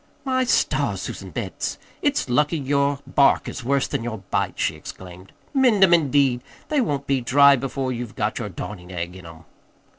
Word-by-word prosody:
"My 260 -1 +1
stars, - - +1
Susan - - -6
Betts, - - -4 0.2
it's 285 - +1
lucky 150 +6 +2
your 140 0 +1
bark 140 0 +3
is 130 - -6
worse 135 +2 +1
than - - -3
your 115 -2 -4
bite!" - - -1
she - - 0
exclaimed. 90 +1 -11 0.2
"Mend 250 -8 +4
'em, 180 -2 +6
indeed! 140 -6 +3 0.3
They 300 -3 +2
won't 140 - -2
be 135 -2 +1
dry 140 +3 +6
before 135 0 -3
you've 120 -3 -5
got 105 0 -1
your 110 -4 -4
darnin' 90 0 -8
egg 90 0 -5
in 95 -2 -11
'em." 80 -1 -13
135 Hz, 180 wpm, -23 LUFS, 110-145 Hz, 0.3 s, em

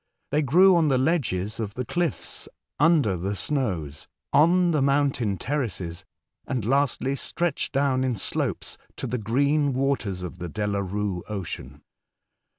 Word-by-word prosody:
They 150 - +2
grew 180 +7 +6
on 165 -2 +3
the 135 -3 +3
ledges 115 - 0
of 105 -2 -4
the 125 - -3
cliffs 175 +2 -2 0.3
under 150 - +4
the 95 +4 -2
snows, 90 - -2 0.3
on 175 +3 +5
the 150 -3 +2
mountain 135 -7 +1
terraces, 95 - -3 0.4
and 125 -6 -2
lastly 135 +1 +1
stretched 170 +2 -1
down 135 -2 +1
in 130 -2 0
slopes 95 - -2 0.2
to - - -4
the 125 0 -2
green 140 +6 +2
waters 125 -9 -1
of 90 0 -7
the 90 -1 -5
Delarue 100 -1 -2
Ocean. 75 -8 -6
125 Hz, 140 wpm, -25 LUFS, 100-145 Hz, 0.4 s, grew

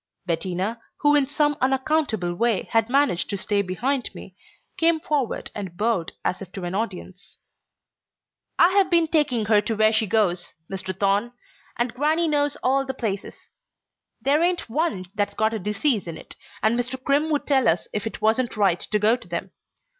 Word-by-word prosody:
Bettina, 185 +6 -2 0.2
who 290 -1 +4
in 285 -2 +3
some 295 0 +2
unaccountable 260 - +1
way 225 +2 +1
had 225 0 +2
managed 275 -9 +2
to 200 - -2
stay 200 +1 0
behind 240 +8 -1
me, - - -11 0.4
came 330 0 +3
forward 290 -6 -2
and 190 -4 -7
bowed 210 -5 0
as 185 - -1
if 190 -2 -9
to 190 - -6
an 175 +1 -3
audience. 190 -3 -5 1.2
"I've 375 +2 +5
been 335 -2 +3
taking 280 -9 +1
her 210 -1 +4
to 220 +2 -2
where 215 +1 +4
she 220 0 +1
goes, 185 -4 +1 0.2
Mr. 190 -1 -5
Thorne, 205 +4 +1 0.4
and 240 0 -1
grannie 310 +6 +1
knows 290 -2 +1
all 270 +2 +3
the 265 -1 -5
places. 210 -6 -5 0.7
There 290 +3 +2
ain't 350 0 +1
one 270 - -1
that's 205 -1 -1
got 220 +1 +1
a 220 - -2
disease 210 +2 0
in 165 -1 -5
it, - - -11 0.3
and 230 +2 +3
Mr. 250 +2 -3
Crimm 285 +3 +2
would 295 -2 0
tell 270 -3 +3
us 165 +1 +1
if 210 +1 -2
it - - -7
wasn't 225 +2 +1
right 195 -4 +3
to 210 - 0
go 215 +3 +4
to 245 - -12
them. 175 +2 -4
225 Hz, 180 wpm, -24 LUFS, 195-280 Hz, 1.2 s, I've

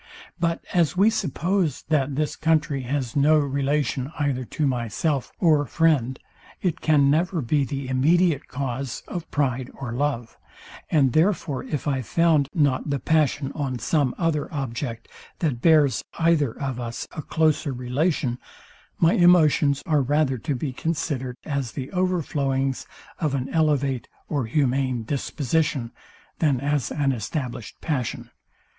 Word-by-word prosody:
But 170 -1 -1
as 175 0 +2
we 205 +4 +5
suppose, 180 - -1
that 145 -3 +1
this 150 +1 -1
country 155 -3 +1
has 130 -1 -3
no 150 +2 +5
relation 140 -1 0
either 140 -3 0
to 150 - -2
myself 130 +3 -1
or 155 -4 +4
friend 140 -5 +2 0.4
it 180 -4 -1
can 145 -3 +4
never 170 +3 +1
be 140 +2 +1
the 135 +1 -4
immediate 155 +4 +2
cause 130 -1 -4
of 175 -2 -6
pride 130 -3 -1
or 130 -4 -6
love; 125 -3 -2 0.5
and 135 -6 +3
therefore 160 -5 +1
if 150 -3 -3
I 135 -2 +1
found 155 +2 +2
not 145 -2 +1
the 140 - +1
passion 145 0 +1
on 135 -4 -2
some 140 0 0
other 165 -4 -1
object, 120 -4 -4 0.3
that 140 -8 -1
bears 150 -6 +4
either 165 -7 +2
of 135 -3 -3
us 120 -1 -5
a 155 - -5
closer 155 -1 +1
relation, 125 +1 -1 0.6
my 165 +1 +4
emotions 155 -5 +4
are 150 -3 +2
rather 135 -1 +1
to 145 +4 -2
be 130 +1 -3
considerd 140 -4 -2
as 140 -5 -2
the 135 -2 -5
overflowings 140 -8 0 0.3
of 150 -4 0
an 130 -1 -2
elevate 140 -5 +1 0.2
or 140 -6 -1
humane 130 -2 +1
disposition, 140 0 -1 0.5
than 145 -6 +2
as 140 -2 0
an 140 -2 +1
established 125 - -4
passion. 135 -7 -3
145 Hz, 140 wpm, -24 LUFS, 130-155 Hz, 0.6 s, we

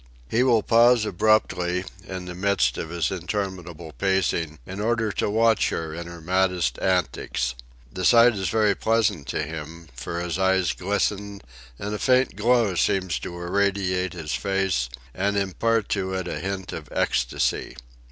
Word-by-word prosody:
He 115 - +1
will 120 -4 +4
pause 115 0 +5
abruptly, 95 -3 +1 0.2
in 95 -1 -6
the 90 - -6
midst 95 -9 +1
of 80 - -4
his 85 -2 -1
interminable 90 -3 -4
pacing, 95 -5 0
in 95 +2 -7
order 110 0 0
to - - -1
watch 110 +1 +3
her 80 -1 -4
in 85 +1 -6
her 85 0 -9
maddest 90 -5 0
antics. 90 -12 0 0.4
The 90 - -4
sight 120 +3 +6
is 95 -4 -2
very 105 -1 +3
pleasant 105 -7 0
to - - -1
him, 80 +1 -8
for 85 +7 -4
his 90 0 -3
eyes 95 -3 +2
glisten 100 0 -2 0.3
and 105 +1 -4
a 105 - -3
faint 130 0 +3
glow 115 -1 +3
seems 90 -4 +1
to 85 - -7
irradiate 95 0 0
his 80 -3 -5
face 95 -11 0 0.2
and 100 +2 0
impart 105 +3 0
to 95 -2 -1
it 95 -1 -3
a - - -4
hint 95 0 -4
of 75 -4 -7
ecstasy. 65 +1 0
95 Hz, 160 wpm, -24 LUFS, 85-105 Hz, 0.4 s, sight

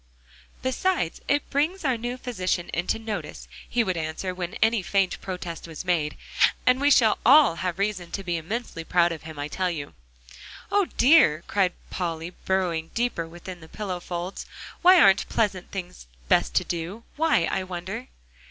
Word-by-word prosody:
"Besides 260 - 0
it 285 0 +1
brings 315 +6 0
our 260 -3 +2
new 240 +2 -4
physician 185 -8 -2
into 175 +5 0
notice," 220 -2 -6 0.2
he 240 - +2
would 185 -5 -1
answer 160 +4 -3
when 180 -1 -5
any 225 -1 +2
faint 195 0 0
protest 180 -3 -6
was 160 +1 -7
made. 160 -4 0 0.5
"And 255 +1 +4
we 285 - +4
shall 230 -6 +5
all 270 - +6
have 180 +1 -2
reason 195 -3 -2
to 195 - -3
be 175 -2 -1
immensely 170 +1 -4
proud 175 +1 +3
of 165 - -5
him, 160 -1 -10
I 145 0 -3
tell 185 +4 -1
you!" 150 -5 -5 0.8
"Oh, 405 -1 +3
dear!" 245 - +5
cried 190 -3 +1 0.2
Polly, 165 -1 -3
burrowing 175 -4 0
deeper 235 -9 -1
within 175 +2 -9
the 160 -1 -14
pillow 195 -4 -4
folds, 175 +1 -5 0.3
"why 365 +1 +8
aren't 195 - +5
pleasant 200 -5 0
things 180 - -7 0.2
best 60 - +2
to - - +4
do? 175 +7 -5
Why, 310 - +3
I 190 - 0
wonder!" 185 +6 -6
185 Hz, 170 wpm, -25 LUFS, 170-235 Hz, 0.8 s, why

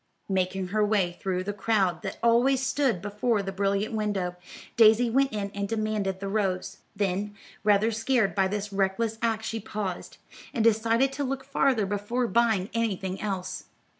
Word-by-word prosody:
Making 185 0 -1
her 210 +2 +1
way 200 -5 +1
through 185 -1 -1
the 205 +2 -3
crowd 195 -5 +1
that - - -5
always 250 +3 +3
stood 260 -8 0
before 210 +1 0
the 195 - -4
brilliant 200 +2 0
window, 205 -5 -1 0.4
Daisy 225 +1 +5
went 270 +3 +3
in 200 -2 -3
and 200 0 -2
demanded 215 -4 -1
the 195 - -4
rose; 195 -2 -1 0.2
then, 200 +1 -1 0.3
rather 210 +2 +4
scared 225 -1 +1
by 195 -1 +2
this 205 +1 -4
reckless 205 +3 0
act 225 -1 0
she 225 0 -3
paused, 200 -3 -5 0.4
and 225 - +1
decided 230 +4 +3
to 285 - -2
look 270 0 -3
farther 265 -5 +1
before 205 +5 -1
buying 225 -4 +1
anything 195 -5 -2
else. 185 -3 -4
210 Hz, 165 wpm, -27 LUFS, 195-230 Hz, 0.4 s, Daisy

